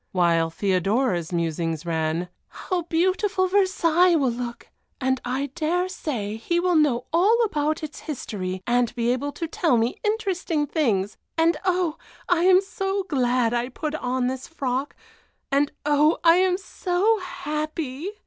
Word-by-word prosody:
While 170 -3 +2
Theodora's 190 +1 0
musings 165 -1 -2
ran: 165 +1 -1 0.2
"How 365 -1 -3
beautiful 370 +3 +1
Versailles 365 -3 +3
will 270 -6 +2
look, 235 0 -6 0.3
and 260 -1 0
I 260 +2 -2
dare 345 +3 0
say 225 - -4
he 340 +10 0
will 360 0 +1
know 270 -6 +2
all 395 +7 +4
about 305 -5 -1
its 305 -1 -6
history, 190 - -5
and 240 -1 +1
be 240 0 +1
able 285 +3 -3
to 330 +3 -4
tell 315 -5 +1
me 230 +2 0
interesting 385 -8 0
things; 220 - 0 0.2
and 330 +1 +3
oh! 355 -3 0 0.3
I 355 -1 +2
am 370 0 +6
so 390 0 -2
glad 250 -7 +1
I 240 +1 -1
put 300 +4 -4
on 255 -4 -1
this 260 0 -3
frock, 270 -3 -3 0.6
and 280 +1 +2
oh! 295 +2 +4
I 335 0 +6
am 370 -1 +3
so 390 +3 0
happy." 310 -3 -4
295 Hz, 150 wpm, -24 LUFS, 240-355 Hz, 0.6 s, am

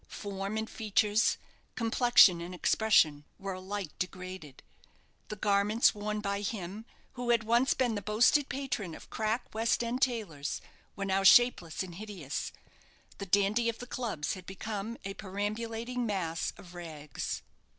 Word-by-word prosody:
Form 200 +1 -4
and 220 0 -2
features, 215 0 +2 0.4
complexion 230 -6 +5
and 175 +2 -6
expression, 170 -7 +3
were 195 -1 -4
alike 185 -2 -5
degraded. 185 -5 -6 0.6
The 210 - -5
garments 205 +2 +3
worn 210 0 -3
by 200 -1 -2
him, 205 0 -4 0.3
who 245 -1 -4
had 235 -1 +4
once 235 +4 +3
been 245 -3 +1
the 205 - -3
boasted 240 +8 +3
patron 250 -10 -3
of - - -13
crack 220 +3 -2
West 225 +2 +1
end 240 +2 -2
tailors, 205 - -1 0.4
were 195 - -3
now 195 0 +1
shapeless 195 -5 +5
and 180 -2 -8
hideous. 185 -7 -5 0.7
The 200 - -5
dandy 205 +5 +3
of 230 - -3
the 245 - -7
clubs 230 -11 -3
had 185 -2 -9
become 210 +3 -5
a 195 - -3
perambulating 225 +5 -3
mass 170 -6 -1
of 180 -1 -13
rags. 155 -4 -5
205 Hz, 145 wpm, -31 LUFS, 185-230 Hz, 0.7 s, complexion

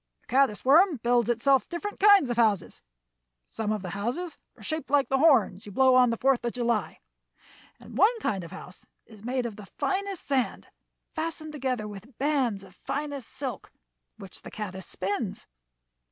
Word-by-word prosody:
"The - - -34
caddis 265 -5 +3
worm 320 +4 +5
builds 240 -1 +2
itself 260 +3 +2
different 410 +4 -5
kinds 400 -10 +6
of 240 - -2
houses. 215 -6 +1 0.6
Some 215 -1 -3
of 210 -2 -2
the 180 - -5
houses 245 - -3 0.2
are - - -14
shaped 315 -4 -3
like 280 -3 +3
the 270 - +2
horns 230 - +3
you - - -8
blow 260 +5 +4
on 250 -1 +6
the 230 - -1
Fourth 260 -1 +2
of 235 - -2
July, 235 -3 -1 0.8
and - - -12
one 460 +3 +4
kind 195 - -2
of 170 - -9
house 185 0 -11 0.2
is 215 -3 -16
made 250 +1 -1
of 225 -3 -5
the 205 -2 -10
finest 390 - -2
sand, 265 -3 -1 0.4
fastened 315 -1 -4
together 255 -7 -2
with 210 +4 -11
bands 260 -8 0
of 190 -1 -15
finest 285 +2 -4
silk, 260 -4 -6 0.5
which - - -10
the - - -9
caddis 190 -4 -6
spins. 200 +3 -3
250 Hz, 175 wpm, -27 LUFS, 215-290 Hz, 0.8 s, kinds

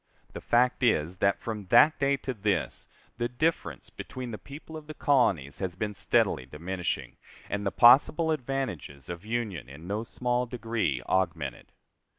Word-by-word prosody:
The - - -7
fact 125 +3 +2
is 90 -7 +2
that, 100 +2 +2
from 105 -4 -6
that 155 - +6
day 140 0 +2
to 130 - -1
this, 105 -2 -2 0.3
the 120 0 0
difference 120 - -2
between 125 -2 -7
the 105 - -6
people 150 - -11
of 155 -1 -9
the 155 - -8
colonies 95 - +2
has 95 -3 -3
been 105 +2 -3
steadily 65 -8 +1
diminishing, 85 +6 -4 0.3
and 100 0 -1
the - - 0
possible 145 +7 +6
advantages 120 - -4
of 85 +1 -6
union 110 - -3
in 75 +4 -11
no 100 +4 -2
small 125 +1 -1
degree 115 - -2
augmented. 80 -8 -1
110 Hz, 160 wpm, -28 LUFS, 85-125 Hz, 0.3 s, that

